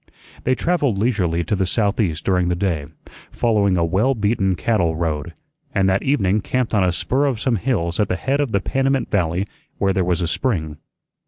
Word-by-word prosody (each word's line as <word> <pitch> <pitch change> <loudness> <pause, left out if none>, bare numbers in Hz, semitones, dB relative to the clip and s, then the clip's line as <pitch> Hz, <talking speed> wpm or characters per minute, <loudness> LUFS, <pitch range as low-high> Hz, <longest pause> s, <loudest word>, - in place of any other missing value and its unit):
They 130 - +3
travelled 145 - 0
leisurely 95 -7 +1
to 95 - -1
the 95 -1 0
southeast 100 -5 0
during 90 -2 +2
the 90 - +1
day, 85 -6 -1 0.4
following 105 -5 +1
a 85 - +2
well 105 +11 +1
beaten 105 -3 +1
cattle 90 -4 +1
road, 80 0 -3 0.4
and 95 -1 +3
that 95 0 +2
evening 110 -7 +1
camped 125 +2 -1
on 105 -3 +3
a 90 - +2
spur 130 +10 0
of 125 -6 -1
some 120 -1 +1
hills 90 -7 -1
at 105 - +2
the 90 - -1
head 135 +9 -1
of 140 -5 -1
the 100 - +1
Panamint 135 +3 0
Valley 90 0 0 0.3
where 95 -1 +1
there 95 - +1
was 90 0 0
a 85 - 0
spring. 80 - -1
100 Hz, 195 wpm, -21 LUFS, 85-120 Hz, 0.4 s, They